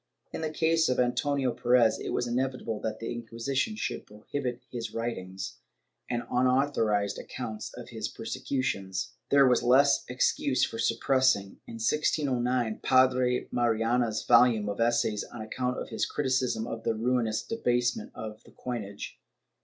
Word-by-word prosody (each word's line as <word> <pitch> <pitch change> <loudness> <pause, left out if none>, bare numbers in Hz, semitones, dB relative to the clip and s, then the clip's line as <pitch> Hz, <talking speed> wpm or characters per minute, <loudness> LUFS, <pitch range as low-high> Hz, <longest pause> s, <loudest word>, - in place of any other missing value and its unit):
In - - -4
the 160 - -1
case 160 +1 +2
of 125 - +1
Antonio 125 +2 +1
Perez, 120 -1 +3
it - - -5
was - - 0
inevitable 125 -2 -2
that 110 0 -3
the 115 - -4
Inquisition 120 - -2
should - - -4
prohibit 120 +4 -5
his 115 -3 -5
writings 95 -5 -4 0.5
and 120 0 -1
unauthorized 125 -6 +2
accounts 110 -4 -6
of - - -9
his - - -4
persecu 135 -2 -3
tions. 95 - -2 0.2
There 140 -1 +6
was 125 -1 +4
less 140 +3 +5
excuse 125 +2 +1
for 115 - -7
suppressing, 115 -4 +2
in 115 - -8
1609, 125 -2 0
Padre 130 -1 +3
Mariana's 115 -1 +1
volume 115 -4 +5
of 100 - -4
essays 115 -2 +1
on 120 - -10
account 125 +3 -2
of - - -5
his - - -1
criticism 130 -5 0
of 115 -1 -5
the 115 - 0
ruinous 115 -1 0
debasement 125 - 0
of 110 0 -7
the - - -19
coinage. 105 -5 -6
120 Hz, 145 wpm, -29 LUFS, 110-130 Hz, 0.5 s, There